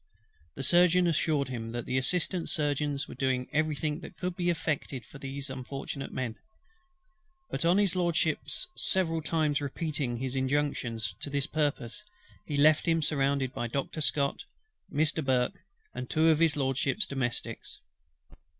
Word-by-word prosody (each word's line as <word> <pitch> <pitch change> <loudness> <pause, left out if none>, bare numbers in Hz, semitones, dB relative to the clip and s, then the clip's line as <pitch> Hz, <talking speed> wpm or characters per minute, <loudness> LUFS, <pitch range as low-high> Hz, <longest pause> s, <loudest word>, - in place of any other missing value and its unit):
The 135 - -4
Surgeon 175 +4 +5
assured 155 -4 +1
him 115 -2 -5
that 120 -1 -3
the 130 - +1
Assistant 175 +5 +1
Surgeons 145 -2 0
were - - -8
doing 130 -1 0
every 155 0 +2
thing 150 +1 -2
that - - -11
could 180 -1 -3
be 175 -1 0
effected 150 -6 -2
for 140 - -12
those 135 +1 -5
unfortunate 135 +1 -5
men; 120 -3 -3 1.1
but - - -1
on 175 +3 +5
HIS 200 -3 +3
LORDSHIP's 175 - 0
several 165 -4 +2
times 155 -2 +1
repeating 140 -3 -2
his 130 +1 -3
injunctions 130 -4 0
to - - -4
that 140 0 -1
purpose, 145 - -1 0.4
he 145 - -2
left 155 +2 +5
him 165 -1 +3
surrounded 140 -3 +1
by 120 - -2
Doctor 140 +5 -3
SCOTT, 140 - +1 0.5
Mr. 155 +1 +1
BURKE, 125 -2 +1 0.3
and 125 0 -5
two 160 +1 +4
of 155 -1 +4
HIS 165 -2 +4
LORDSHIP'S 135 - +1
domestics. 130 -6 -3
145 Hz, 150 wpm, -30 LUFS, 130-160 Hz, 1.1 s, Surgeon